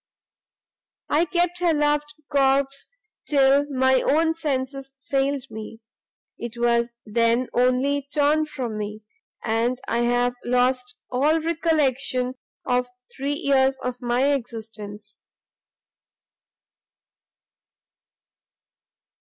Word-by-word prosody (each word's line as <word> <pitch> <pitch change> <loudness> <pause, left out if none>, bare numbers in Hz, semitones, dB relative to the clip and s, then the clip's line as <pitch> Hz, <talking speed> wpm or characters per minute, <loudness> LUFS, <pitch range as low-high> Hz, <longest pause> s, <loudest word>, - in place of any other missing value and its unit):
"I 320 +4 +3
kept 350 +1 0
her 345 -3 +2
loved 295 0 0
corpse 275 -1 +1 0.4
till 280 0 +4
my 260 -1 +3
own 320 +3 +2
senses 270 -3 -3
failed 275 -1 0
me, 220 +1 -8 0.6
it 235 0 -6
was 235 0 +1
then 230 +3 +1
only 260 +3 +2
torn 305 +1 +2
from 240 -7 -4
me, 210 +1 -5 0.4
and 235 +3 0
I 235 - 0
have 245 +1 +2
lost 250 0 +1
all 295 +6 +2
recollection 295 -6 0 0.3
of 250 -1 +1 0.3
three 280 +2 -1
years 270 -2 +2
of 250 0 -4
my 250 +4 +2
existence!" 220 -4 -7
265 Hz, 95 wpm, -24 LUFS, 240-285 Hz, 0.6 s, till